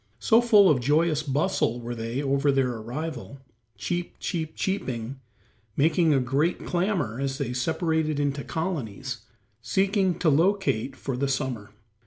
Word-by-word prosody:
So 220 - +4
full 210 -5 +6
of 150 -7 +4
joyous 155 +4 +2
bustle 140 -3 0
they 120 +2 -4
were 135 -1 0
over 140 +1 +3
their 135 -2 +2
arrival, 130 +4 -6 0.4
"cheep, 175 0 -3
cheep, 160 -4 -3
cheeping," 130 - -3 0.6
making 160 +2 +3
a 140 - +4
great 140 +7 0
clamor 175 - -1
as 135 -1 -2
they 135 -4 -3
separated 160 +3 0
into 140 -1 -1
colonies, 135 - -4 0.4
seeking 190 - +1
to 175 - 0
locate 160 - +1
for 130 0 -4
the 140 +3 0
summer. 125 -6 -2
140 Hz, 140 wpm, -26 LUFS, 125-170 Hz, 0.6 s, full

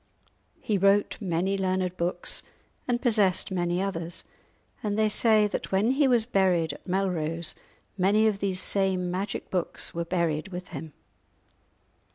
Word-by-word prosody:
He 205 -3 -1
wrote 200 +3 +2
many 190 +1 -1
learned 185 -1 -1
books, 175 0 +1 0.5
and 245 -1 +1
possessed 210 -9 +2
many 175 -1 -1
others; 175 -3 -1 0.6
and 205 -1 -2
they 215 0 +3
say 215 0 +5
that 205 - -4
when 200 +5 +2
he 275 +1 +3
was 240 -4 +3
buried 185 -8 +1
at - - -14
Melrose 170 -4 -1 0.5
many 205 +4 +3
of 210 -3 +1
these 190 -2 -1
same 185 -2 +1
magic 195 +2 -4
books 180 -3 -2
were 170 - -2
buried 170 -2 -1
with 180 -1 -8
him. 155 -1 -8
190 Hz, 145 wpm, -27 LUFS, 175-205 Hz, 0.6 s, say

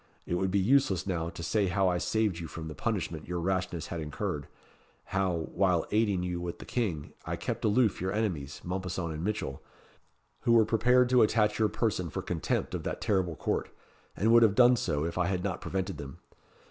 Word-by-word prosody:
It - - -3
would 95 +2 +1
be 95 - +1
useless 100 -2 +3
now 85 -4 -2
to 85 - -8
say 100 +4 +1
how 95 +1 +2
I 90 -1 +1
saved 110 -5 0
you 85 - -5
from 80 +1 -7
the 80 - -6
punishment 90 -7 -3
your 90 0 -2
rashness 90 -2 -1
had 85 - -3
incurred 75 -1 -3 0.6
how, 90 -4 -1
while 90 -3 +2
aiding 105 -4 +2
you 90 -1 -3
with 85 -1 -4
the - - -10
King, 95 -12 -2
I - - -1
kept - - -4
aloof 110 -2 +2
your 95 +1 -1
enemies, 90 -11 -2
Mompesson 90 -2 -3
and 80 +1 -5
Mitchell, 100 -10 -3 0.8
who 120 - +2
were 115 -2 +6
prepared 125 +3 +4
to 125 -1 +5
attach 105 -1 +3
your 110 -1 +3
person 100 -6 -1
for - - -4
contempt - - -2
of - - -2
that - - -4
terrible 95 -5 0
court, - - -2 0.5
and 110 +5 +3
would 120 - +8
have 110 -3 +5
done 125 +1 +7
so, 80 -9 -1
if 85 +2 -3
I 90 - +2
had 90 -1 -1
not 95 -2 -2
prevented 95 -1 -3
them. 70 -2 -8
95 Hz, 205 wpm, -30 LUFS, 85-110 Hz, 0.8 s, would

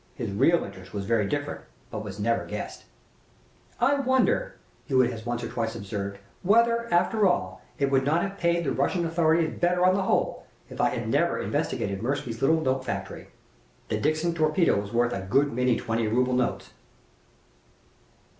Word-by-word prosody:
His - - -4
real 165 +12 +3
intent 95 +1 -11
was 100 -1 -3
very 110 -2 +1
different, 145 +5 -3 0.3
but 110 -2 -4
was 105 -1 -8
never 115 +2 +1
guessed. - - -6 0.9
"I 250 +5 +4
wonder," 260 - +1 0.3
Hewitt 130 -4 +3
has 110 +1 -8
once 120 0 -2
or - - -3
twice 115 -1 -3
observed, 100 -1 -5 0.2
"whether, 235 +4 +3
after 190 +4 +3
all, 175 -1 -1 0.2
it 140 -1 0
would 135 -1 +3
not 155 +5 +2
have 195 0 -5
paid 170 0 +1
the 135 - -1
Russian 170 +7 0
authorities 165 -1 +1
better 180 +1 +2
on 185 - +5
the 195 - +1
whole 190 - 0 0.2
if - - -3
I - - +4
had - - -4
never - - +1
investigated 100 -1 -2
Mirsky's 120 -2 -3
little 160 +4 +3
note 130 -2 0
factory. 100 -6 -5 0.6
The - - -1
Dixon 155 +3 0
torpedo 155 - +2
was 100 0 -8
worth 120 +1 +1
a 95 - -3
good 135 +10 +1
many 125 0 +2
twenty 115 -1 -1
ruble 125 +3 +1
notes." 125 -1 -1
135 Hz, 175 wpm, -26 LUFS, 115-170 Hz, 0.9 s, on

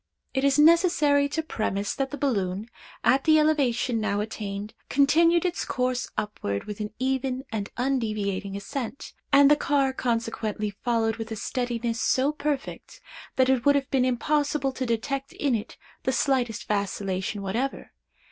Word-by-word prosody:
"It 265 - 0
is 280 0 +3
necessary 300 -3 +5
to 320 +2 -2
premise, 205 -8 -2
that 270 -1 -2
the 290 - -6
balloon, 200 -8 -1 0.4
at 270 +1 +3
the 310 -1 +6
elevation 260 -6 +2
now 205 -1 0
attained, 210 -1 -5 0.2
continued 330 +5 +4
its 355 -1 -1
course 255 -2 -1
upward 100 - -3
with 210 0 -7
an 210 0 -4
even 265 0 -1
and 210 -3 -3
undeviating 215 -6 -1
ascent, 265 +5 -6 0.2
and 280 0 +7
the - - +8
car 275 -2 +1
consequently 230 -4 -2
followed 225 +1 0
with 225 0 -6
a - - -2
steadiness 235 0 -2
so 265 +3 +2
perfect 290 -2 -4 0.4
that 260 -1 +4
it 260 -3 +2
would 285 0 +5
have 275 -1 -1
been 265 -2 +3
impossible 285 +2 +1
to 260 -1 -4
detect 275 +5 -2
in 280 -3 0
it 215 -2 -3 0.2
the 260 - 0
slightest 255 -4 0
vacillation 200 -1 -2
whatever. 235 +8 -3
255 Hz, 155 wpm, -26 LUFS, 215-280 Hz, 0.4 s, the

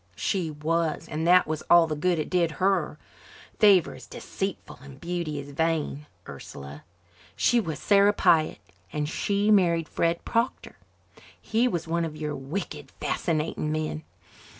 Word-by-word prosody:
"She 180 -5 -1
was 160 +2 -1
and 160 +2 -2
that 180 +1 +6
was 155 0 -3
all 170 -1 +7
the 155 -1 -3
good 175 +3 +1
it 155 - -2
did 170 -3 +2
her. 185 -4 0 0.6
'Favour 200 -6 +5
is - - -12
deceitful 195 0 -6
and 135 -1 -13
beauty 170 -2 -3
is 145 0 -7
vain,' 150 -1 -1 0.2
Ursula. 70 +2 -10 0.5
She 240 - +3
was 165 -8 -3
Sarah 200 0 +4
Pyatt 160 -6 +3 0.3
and 150 -1 -2
she 200 +6 0
married 170 -5 +3
Fred 170 0 -1
Proctor. 235 +2 -2 0.6
He 230 +3 +1
was 170 -8 -2
one 170 +1 0
of 155 -2 -5
your 150 -1 -3
wicked, 145 0 -6
fascinating 155 -2 -1
men. 155 0 -2
165 Hz, 150 wpm, -26 LUFS, 150-180 Hz, 0.6 s, all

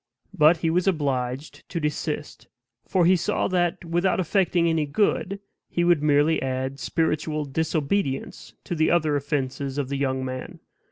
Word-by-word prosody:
But 160 -1 +5
he 160 - +3
was 180 +3 +1
obliged 140 -5 -2
to 170 - -3
desist; 150 -1 -3 0.4
for 180 -2 +2
he 185 +2 +6
saw 175 - 0
that, 175 -2 0
without 175 +3 +1
effecting 180 -2 +2
any 160 -2 +1
good, 200 +4 0 0.3
he 175 - 0
would 175 -3 +4
merely 150 +2 +3
add 130 +1 -3
spiritual 155 -1 -1
disobedience 155 +1 -2
to - - -4
the 160 -1 +2
other 155 -3 +2
offenses 140 -1 -2
of 140 -3 -2
the 140 - -2
young 130 -1 -1
man. 130 0 -6
155 Hz, 155 wpm, -25 LUFS, 140-175 Hz, 0.4 s, he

